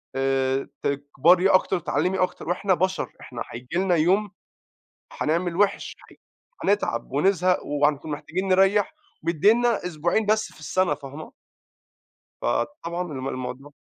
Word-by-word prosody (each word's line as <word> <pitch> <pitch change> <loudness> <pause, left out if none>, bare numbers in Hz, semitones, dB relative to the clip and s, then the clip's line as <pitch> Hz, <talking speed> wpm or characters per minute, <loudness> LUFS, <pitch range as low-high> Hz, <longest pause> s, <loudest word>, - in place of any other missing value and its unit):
آآ 135 0 0
تكبري 145 +7 +3
أكتر، 185 0 +3
تتعلّمي 180 +5 0
أكتر، 180 -2 -2
وإحنا 185 +2 +1
بشر، 185 +2 -1
إحنا 120 -2 -8
هييجي 125 +6 -8
لنا 185 -1 +2
يوم 190 +6 +2 0.9
هنعمل 170 +2 0
وحِش 200 -1 +1 0.2
هي - - -18 0.5
هنتعب 200 - 0
ونزهق 180 +5 +2
وهنكون 145 +1 0
محتاجين 180 +6 -3
نريّح، 195 +2 +3 0.3
مديّننا 210 +7 +3
أسبوعين 175 +6 0
بس 215 +1 +1
في - - -18
السنة، 185 +4 0
فاهمة؟ 145 +3 -10 1.1
فطبعًا 175 - -2
الم 130 0 -4
الموضوع 130 +2 -6
175 Hz, 120 wpm, -24 LUFS, 145-190 Hz, 1.1 s, تكبري